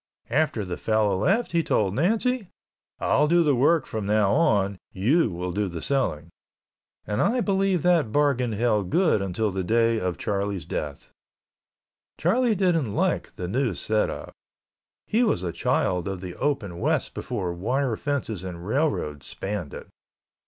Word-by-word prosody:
After 145 -6 +1
the 90 -1 -4
fellow 110 -3 +1
left 195 - +1
he 170 - +2
told 100 - +1
Nancy, 220 - +1 0.5
"I'll 150 - +2
do 170 +2 +4
the 150 -3 +3
work 140 +4 +3
from 110 -3 -4
now 105 -1 +3
on—you 105 - +1
will 90 0 -4
do 100 +2 -1
the 85 -2 -5
selling," 85 - -1 0.8
and 105 0 -1
I 250 +2 +2
believe 195 -5 +1
that 170 -10 +3
bargain 135 -5 +2
held 105 -4 +1
good 170 - +3
until 95 +3 -1
the 95 0 -2
day 115 +3 +2
of 90 -3 -2
Charlie's 100 -2 -2
death. 75 -2 -5 1.1
Charlie 230 +6 +2
didn't 165 - +1
like - - 0
the 90 - -4
new 120 +1 0
set 110 +4 0
up. - - -7 0.7
He 225 - +1
was 215 - +1
a 85 - -2
child 90 +1 0
of 95 -2 -3
the 90 -1 -7
open 110 -12 -2
West - - 0
before 90 -2 -3
wire 120 +7 -1
fences 115 - -3
and 90 -2 -7
railroads 100 - -1
spanned 95 -6 -4
it. - - -9
110 Hz, 155 wpm, -25 LUFS, 95-155 Hz, 1.1 s, do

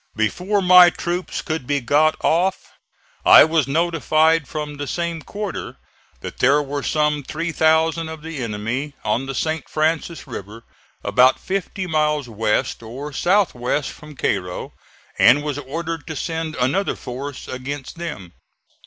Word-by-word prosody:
Before 180 - 0
my 180 -1 +8
troops 175 +2 -4
could 155 -5 -4
be 145 -1 +1
got 150 +5 +3
off, 185 +4 +1 0.5
I - - +9
was 160 -3 +1
notified 160 0 +2
from 150 -2 -5
the 145 0 -4
same 170 0 -3
quarter 205 +3 -6 0.4
that - - -8
there 135 +4 +4
were 145 0 -3
some 150 -1 +1
3,000 160 +1 +1
of 160 -1 -8
the 160 -4 -6
enemy 115 +7 -3
on 120 +5 0
the 135 - -4
St. 160 +4 -2
Francis 160 +1 -1
River 115 -3 -8 0.4
about 130 +1 +4
fifty 190 0 -3
miles 150 -4 0
west, 110 -1 -1
or 135 +6 -7
south 195 +6 +2
west, 125 +3 -2
from 150 -2 -13
Cairo, 90 -8 -2 0.5
and 145 +4 +6
was 145 -1 -3
ordered 165 +3 -5
to 160 - -5
send 160 +1 -3
another 135 +11 0
force 135 +2 -7
against 135 +4 -6
them. 100 - -6
150 Hz, 145 wpm, -21 LUFS, 130-165 Hz, 0.5 s, I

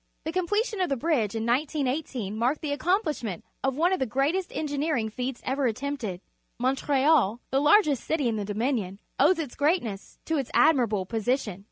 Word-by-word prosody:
The 320 - -3
completion 415 +4 0
of 365 - +1
the 275 - 0
bridge 240 -8 0
in 225 0 -2
1918 260 -4 -1
marked 245 +7 0
the 285 -2 -1
accompUsh 340 - 0
ment 195 -7 -5 0.2
of 270 -1 +1
one 350 +4 +3
of 375 - 0
the 260 - 0
greatest 285 - 0
engineering 290 -6 -1
feats 250 +3 -5
ever 265 0 +1
at 225 - -1
tempted. 255 -9 -4 0.4
Montreal, 265 -2 +2
the 270 +1 +2
largest 300 - +4
city 305 -5 0
in 230 - 0
the 210 - -2
Dominion, 205 -2 -2 0.2
owes 320 +6 +5
its 295 -7 -4
great 315 +5 +2
ness 200 -4 -7
to 320 - 0
its 270 -4 -2
admiral:)lo 235 -11 +3
position. 225 -1 -1
270 Hz, 185 wpm, -27 LUFS, 230-310 Hz, 0.4 s, owes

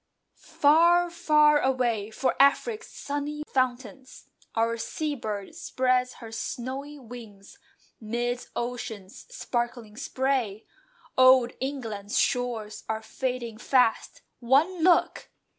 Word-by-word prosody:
Far, 340 +4 +4
far 300 -3 +4
away! 240 -6 0
For 255 +4 -1
"Afric's 430 - +2
sunny 290 +1 -4
fountains" 255 0 -3 0.3
Our 230 +1 +1
seabird 225 -5 -4
spreads 255 -1 0
her 225 -2 -11
snowy 265 +6 -5
wings 225 -6 -12 0.4
Midst 240 +2 -3
ocean's 225 -5 -6
sparkling 240 - -4
spray; 255 -5 -2 0.5
Old 255 -1 +6
England's 225 -7 -4
shores 225 -4 -1
are 220 0 -2
fading 240 -1 -4
fast; 250 -2 +1 0.2
One 290 +9 +2
look! 350 -1 +3
250 Hz, 95 wpm, -26 LUFS, 225-280 Hz, 0.5 s, Old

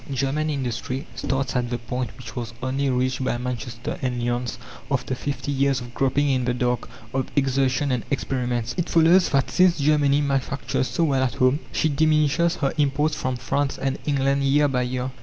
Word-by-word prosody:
German 140 +4 0
industry 130 -1 -3
starts 135 0 -2
at 120 -1 0
the 120 - -1
point 120 -1 -4
which 115 -3 -10
was 115 -3 -5
only 135 +1 0
reached 130 +1 0
by 125 - 0
Manchester 120 -1 -5
and 125 -2 -1
Lyons 120 0 -2 0.3
after - - -1
fifty 145 +2 -3
years 140 -1 +2
of 120 -1 -9
groping 135 +2 +1
in 130 -2 +1
the 125 0 0
dark, 125 0 -1 0.2
of 130 0 -1
exertion 135 0 +1
and 125 -3 0
experiments. 125 -4 -1
It 175 - -1
follows 170 +3 +5
that 135 -2 +1
since 180 -1 +4
Germany 145 -1 +3
manufactures 135 -2 -1
so 170 - 0
well 140 -4 +2
at 130 -2 0
home, 130 +3 +3
she - - +1
diminishes 155 +3 +2
her 140 -5 -1
imports 150 +2 +2
from 130 -3 -2
France 135 +4 -1
and 135 0 -2
England 140 -1 +2
year 145 +2 +4
by 130 -2 0
year. 125 +1 -2
135 Hz, 185 wpm, -24 LUFS, 125-145 Hz, 0.3 s, follows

